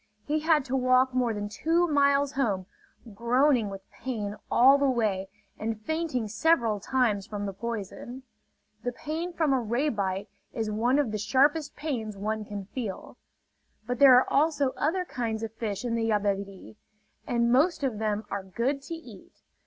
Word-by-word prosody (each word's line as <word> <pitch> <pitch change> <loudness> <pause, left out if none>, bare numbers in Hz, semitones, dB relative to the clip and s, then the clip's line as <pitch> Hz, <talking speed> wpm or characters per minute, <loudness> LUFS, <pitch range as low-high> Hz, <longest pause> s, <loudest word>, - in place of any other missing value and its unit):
He 305 +1 0
had 310 -3 +2
to 265 -1 -2
walk 255 0 +3
more 250 -2 +1
than 205 -1 -3
two 330 +11 +1
miles 280 -2 +3
home, 215 -10 -1 0.5
groaning 240 +1 +2
with 195 0 -9
pain 210 -6 -4
all 270 +3 +6
the 280 -1 +3
way 205 -6 0 0.3
and 220 0 -3
fainting 305 -2 -2
several 225 -2 +2
times 215 -3 0
from 205 -2 -4
the 195 - -4
poison. 235 +4 -6 0.6
The 245 - -3
pain 320 +7 -4
from 320 -5 +1
a 265 - +3
ray 240 +7 0
bite 195 -4 -2 0.3
is 220 -2 -2
one 240 +5 +2
of 285 -7 +1
the 215 - -3
sharpest 280 +8 +2
pains 240 -9 -4
one 215 +2 -3
can 205 -1 -6
feel. 210 -2 -6 0.7
But 245 +2 -3
there 275 -3 +9
are 255 - +3
also 285 -2 +2
other 360 +7 -1
kinds 225 -7 -3
of 220 -1 -5
fish 220 0 -4
in 235 - -1
the 225 -1 0
Yabebirì; 200 - -2 0.5
and 235 -1 +1
most 300 +5 +3
of 245 -6 -1
them 215 -1 -1
are 200 - -2
good 240 +9 -2
to 330 +4 -6
eat. 330 - -14
240 Hz, 170 wpm, -27 LUFS, 210-280 Hz, 0.7 s, there